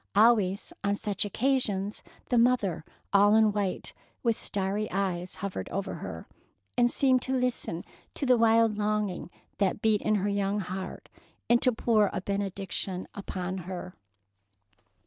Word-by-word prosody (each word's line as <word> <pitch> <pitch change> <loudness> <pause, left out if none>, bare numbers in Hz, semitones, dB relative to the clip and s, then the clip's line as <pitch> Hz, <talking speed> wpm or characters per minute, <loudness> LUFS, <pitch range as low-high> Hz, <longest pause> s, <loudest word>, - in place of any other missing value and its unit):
Always 205 -3 +4
on 200 0 +1
such 205 0 -1
occasions 210 -4 0 0.3
the 245 - +2
mother 210 -9 +2 0.3
all 205 +1 +6
in 220 -1 +5
white, 200 -2 -2 0.3
with 230 -2 +2
starry 200 +2 -1
eyes, 185 -2 -2
hovered 200 -1 -4
over 195 +1 -3
her, - - -7 0.5
and 240 0 +4
seemed 260 0 +3
to 260 +1 0
listen 250 -9 -2 0.3
to 285 - -1
the 255 -1 +5
wild 225 -2 +4
longing 210 -4 -1 0.3
that 200 0 0
beat 215 -2 +3
in 215 - +2
her 200 0 0
young 200 0 0
heart, 190 0 -6 0.4
and 240 0 +4
to 255 - +5
pour 220 -3 +2
a - - -2
benediction 195 -1 -3
upon 185 -2 -4
her. 180 -1 -6
205 Hz, 145 wpm, -28 LUFS, 195-225 Hz, 0.5 s, all